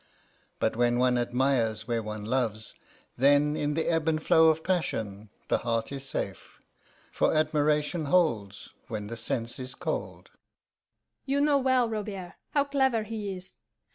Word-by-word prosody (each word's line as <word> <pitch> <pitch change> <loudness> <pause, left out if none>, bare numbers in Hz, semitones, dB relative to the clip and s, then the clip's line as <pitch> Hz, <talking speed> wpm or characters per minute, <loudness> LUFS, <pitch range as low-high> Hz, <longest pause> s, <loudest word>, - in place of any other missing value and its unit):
But 110 - 0
when 120 +1 +2
one 125 0 +3
admires 120 -3 0
where 115 -2 0
one 105 -1 -6
loves, 110 -3 -1 0.4
then 145 +3 +4
in 145 -1 -1
the 160 - 0
ebb 165 -1 +1
and 155 -1 +2
flow 160 +1 +5
of 160 0 +1
passion 110 - -2 0.2
the - - +2
heart 115 0 -1
is 135 -1 -5
safe, - - -5 0.5
for - - +1
admiration 155 +1 +1
holds 115 - +1 0.2
when 105 -2 -4
the 115 +3 -6
sense 115 +1 -3
is 130 0 -7
cold. - - -4
130 Hz, 115 wpm, -28 LUFS, 115-150 Hz, 0.5 s, flow